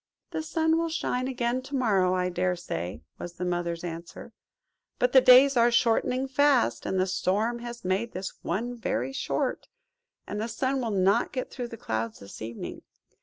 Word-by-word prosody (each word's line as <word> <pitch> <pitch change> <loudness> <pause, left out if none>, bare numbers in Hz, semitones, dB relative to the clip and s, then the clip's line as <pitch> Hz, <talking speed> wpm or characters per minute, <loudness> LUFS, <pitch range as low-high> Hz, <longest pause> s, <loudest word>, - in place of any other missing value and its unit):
"The - - -2
sun 320 +1 +1
will 335 0 0
shine 255 -5 -1
again 250 -1 -1
to 275 +2 -6
morrow, 195 -8 +2
I 180 0 0
dare 180 0 0
say," 85 - -5 0.2
was 175 - -6
the 180 +1 -4
Mother's 175 -1 -2
answer; 170 0 -7 0.6
"but 250 0 +2
the 260 - +8
days 260 +2 +7
are 235 0 +5
shortening 240 +2 +2
fast; 275 -1 +2
and 190 - 0
the 185 - +3
storm 200 +5 0
has 235 -3 -8
made 195 +6 0
this 185 +1 -5
one 235 +8 -2
very 240 +3 -2
short; - - -2 0.6
and 210 - -4
the 225 - -2
sun 260 +3 -1
will 235 - -2
not 200 +3 +2
get 255 -1 -4
through 245 -2 -5
the 230 - -9
clouds 110 - -3
this 100 - -11
evening. 115 +1 -6
230 Hz, 180 wpm, -27 LUFS, 180-255 Hz, 0.6 s, the